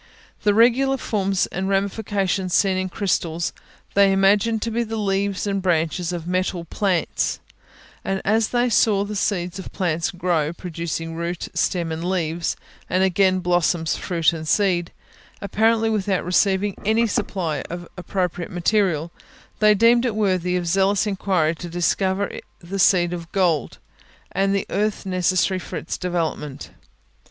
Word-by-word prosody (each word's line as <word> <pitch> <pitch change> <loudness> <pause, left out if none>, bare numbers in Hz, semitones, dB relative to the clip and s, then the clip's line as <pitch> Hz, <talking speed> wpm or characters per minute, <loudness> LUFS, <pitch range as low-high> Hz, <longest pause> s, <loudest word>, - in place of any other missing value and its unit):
The 205 -1 +2
regular 255 +4 +4
forms 195 -5 0
and 190 +1 -2
ramifications 195 -2 0
seen 195 -2 +3
in 185 0 -2
crystals, 170 -4 -1 0.4
they 200 -1 +5
imagined 205 +3 +3
to 230 - -2
be 235 +2 0
the 225 0 -4
leaves 200 -1 -1
and 195 -1 -1
branches 170 0 0
of 170 -2 -5
metal 180 -1 -1
plants; 185 -1 -1 0.6
and 195 0 -1
as 220 +1 +3
they 245 0 +1
saw 210 -3 +3
the 210 +1 -5
seed 180 -2 -1
of 190 - -8
plants 170 -2 -1
grow, 175 -4 -1
producing 165 -2 -5
root, 170 +1 -4
stem 170 -1 0
and 160 +1 -4
leaves, 175 -2 -1 0.3
and 185 +2 +2
again 185 0 +3
blossoms, 175 -2 +1
fruit 170 -2 +1
and 160 -1 -6
seeds, 180 -2 +2 0.5
apparently 225 +2 +2
without 200 -4 0
receiving 190 +2 +2
any 220 +3 +3
supply 170 -8 -2
of 175 0 -6
appropriate 180 -2 -3
material, 175 -3 +1 0.5
they 210 0 +5
deemed 235 +3 +5
it 240 -4 -1
worthy 185 -4 +1
of 180 -1 -1
zealous 195 +4 +2
inquiry 185 -5 +1
to 175 +1 -8
discover 190 +3 0 0.2
the 190 +3 -6
seed 175 -2 +4
of 170 -1 -7
gold, 175 -6 +1 0.5
and 195 +1 +1
the 200 - -1
earth 210 0 -1
necessary 185 0 +1
for - - -6
its - - -4
development. 165 -5 -3
185 Hz, 145 wpm, -22 LUFS, 175-200 Hz, 0.6 s, they